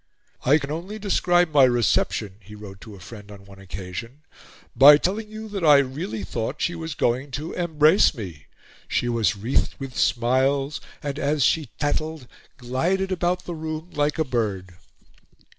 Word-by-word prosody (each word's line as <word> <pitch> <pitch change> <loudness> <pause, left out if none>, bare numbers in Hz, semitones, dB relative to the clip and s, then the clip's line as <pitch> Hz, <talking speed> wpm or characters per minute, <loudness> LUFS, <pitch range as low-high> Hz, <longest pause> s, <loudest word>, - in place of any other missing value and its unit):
"I 145 +4 +5
can 140 -2 -5
only 180 +7 -5
describe 175 -4 +2
my 140 -2 +6
reception," 115 -4 +1
he 105 +1 -13
wrote 100 -2 -11
to 110 -3 -11
a - - -13
friend 105 +2 -11
on 100 -1 -13
one 100 -1 -15
occasion, 95 - -8 0.5
"by 140 +4 +9
telling 210 +7 -2
you 215 0 -8
that 200 -3 -4
I 150 -3 +7
really 130 -6 -2
thought 115 +8 -4
she 175 - 0
was 160 -3 -6
going 125 +4 0
to 155 +3 -6
embrace 160 +1 +4
me. 90 - -9 0.4
She 120 - -1
was 115 -7 +1
wreathed 110 +6 -1
with 135 -3 -8
smiles, 135 +4 +1 0.2
and, 145 0 -4
as 145 -1 +1
she 150 +2 +1
tattled, 155 -1 -2 0.3
glided 170 +10 -1
about 180 0 -1
the 175 - -5
room 160 +1 -6
like 150 +1 0
a 160 - +1
bird." 100 -8 -2
140 Hz, 165 wpm, -23 LUFS, 110-160 Hz, 0.5 s, by